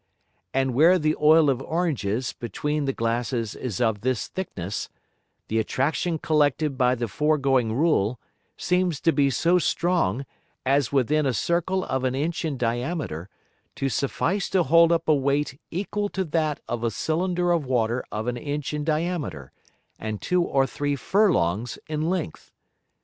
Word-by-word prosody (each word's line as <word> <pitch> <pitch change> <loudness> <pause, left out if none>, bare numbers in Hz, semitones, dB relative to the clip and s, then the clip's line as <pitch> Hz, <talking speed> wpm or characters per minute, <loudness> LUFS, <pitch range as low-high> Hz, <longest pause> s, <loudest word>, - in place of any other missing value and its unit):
And 135 -1 0
where 165 +8 +6
the 155 -2 +1
Oil 155 +1 +6
of 135 -2 +1
Oranges 135 - -1
between 150 +5 -3
the 135 - +1
Glasses 115 -1 -1
is 115 -8 -5
of 110 -4 +1
this 125 -1 -1
thickness, 100 - -5 0.6
the 110 - 0
Attraction 155 +8 0
collected 150 -2 +1
by 125 -1 +3
the 120 -1 -2
foregoing 135 -1 +1
Rule, 125 -6 +1 0.4
seems 180 -4 0
to 165 - +4
be 140 -3 +2
so 170 +7 +2
strong, 165 - 0 0.4
as 135 -1 +2
within 140 +2 +2
a 130 - 0
Circle 175 +2 0
of 130 -1 -2
an 130 0 0
Inch 160 +6 -2
in 155 -4 -2
diameter, 120 - -2 0.5
to 135 - -1
suffice 165 - -1
to 185 -2 +3
hold 165 +1 +5
up 165 -1 +1
a 155 - +5
Weight 140 0 0
equal 205 +3 -2
to 190 - -2
that 155 -2 0
of 120 -1 -3
a 115 - +2
Cylinder 175 - 0
of 165 -6 0
Water 120 -1 0
of 110 +1 -3
an 125 0 -2
Inch 145 +3 -4
in 150 0 -2
diameter, 155 - -2 0.5
and 110 -1 -4
two 180 0 +1
or 135 -5 +2
three 145 +1 -2
Furlongs 120 - +1
in 155 +1 -2
length. 180 - -4
145 Hz, 160 wpm, -25 LUFS, 120-165 Hz, 0.6 s, where